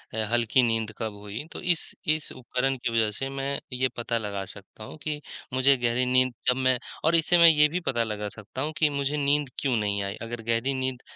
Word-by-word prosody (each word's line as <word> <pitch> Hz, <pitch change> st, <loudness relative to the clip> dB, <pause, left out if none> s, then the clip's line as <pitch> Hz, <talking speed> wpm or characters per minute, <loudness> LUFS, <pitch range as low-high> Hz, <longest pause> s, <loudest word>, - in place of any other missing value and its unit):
ह 110 Hz, -, 0 dB
हल्की 120 Hz, +2 st, +3 dB
नींद 115 Hz, -2 st, 0 dB
कब 110 Hz, -2 st, -3 dB
हुई, 105 Hz, +6 st, -6 dB
तो -, -, -7 dB
इस 175 Hz, -2 st, 0 dB
इस 155 Hz, 0 st, 0 dB
उपकरण 130 Hz, +1 st, -1 dB
की 120 Hz, -, -2 dB
वजह 110 Hz, -2 st, +2 dB
से 135 Hz, 0 st, -3 dB
मैं 135 Hz, 0 st, -2 dB
ये 130 Hz, +1 st, +1 dB
पता 115 Hz, 0 st, -1 dB
लगा 100 Hz, -3 st, -3 dB
सकता 100 Hz, +3 st, -11 dB
हूँ 110 Hz, -, -9 dB
कि 150 Hz, -1 st, -2 dB, 0.3 s
मुझे 135 Hz, +2 st, +5 dB
गहरी 120 Hz, +1 st, +1 dB
नींद 130 Hz, -1 st, +3 dB, 0.2 s
जब 125 Hz, -, +4 dB
मैं 130 Hz, -1 st, +3 dB, 0.3 s
और 165 Hz, +1 st, +5 dB
इससे 165 Hz, +2 st, +4 dB
मैं 170 Hz, 0 st, +8 dB
ये 150 Hz, -1 st, +6 dB
भी 180 Hz, -, -1 dB
पता 120 Hz, -2 st, +2 dB
लगा 105 Hz, -1 st, -3 dB
सकता 105 Hz, +4 st, -7 dB
हूँ 155 Hz, +3 st, -2 dB
कि 155 Hz, -, +4 dB
मुझे 140 Hz, +1 st, -1 dB
नींद 145 Hz, -1 st, +1 dB
क्यों 135 Hz, -4 st, +1 dB
नहीं 100 Hz, -2 st, 0 dB
आई? 100 Hz, 0 st, -3 dB
अगर 115 Hz, 0 st, -5 dB
गहरी 115 Hz, +4 st, 0 dB
नींद 130 Hz, -1 st, -2 dB
125 Hz, 225 wpm, -27 LUFS, 115-140 Hz, 0.3 s, मैं